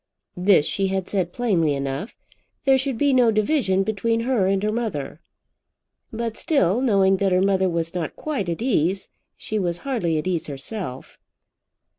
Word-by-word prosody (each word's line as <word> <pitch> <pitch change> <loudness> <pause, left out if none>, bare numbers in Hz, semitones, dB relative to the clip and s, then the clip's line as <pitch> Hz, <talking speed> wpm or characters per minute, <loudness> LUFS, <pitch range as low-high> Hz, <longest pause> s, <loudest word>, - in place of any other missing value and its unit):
This 180 -4 +4
she 195 +4 0
had 190 -1 -2
said 185 -4 -1
plainly 175 -12 +1
enough. 140 - -4 0.5
There 270 -1 +4
should 265 -2 -2
be 285 +2 +2
no 250 -3 +5
division 215 -3 +1
between 225 +2 0
her 235 -6 +1
and 195 0 +1
her 210 - +1
mother. 170 - -4 0.9
But 230 -1 -4
still, 250 - +2
knowing 195 -6 +3
that 195 0 +1
her 180 - +3
mother 190 -1 +2
was 165 -1 -2
not 170 -4 -3
quite 275 - -3
at 170 +6 -3
ease, 190 - 0 0.3
she 215 - -3
was 175 -3 -1
hardly 210 - 0
at 155 - -2
ease 175 -3 -1
herself. 140 - -6
195 Hz, 165 wpm, -23 LUFS, 170-230 Hz, 0.9 s, no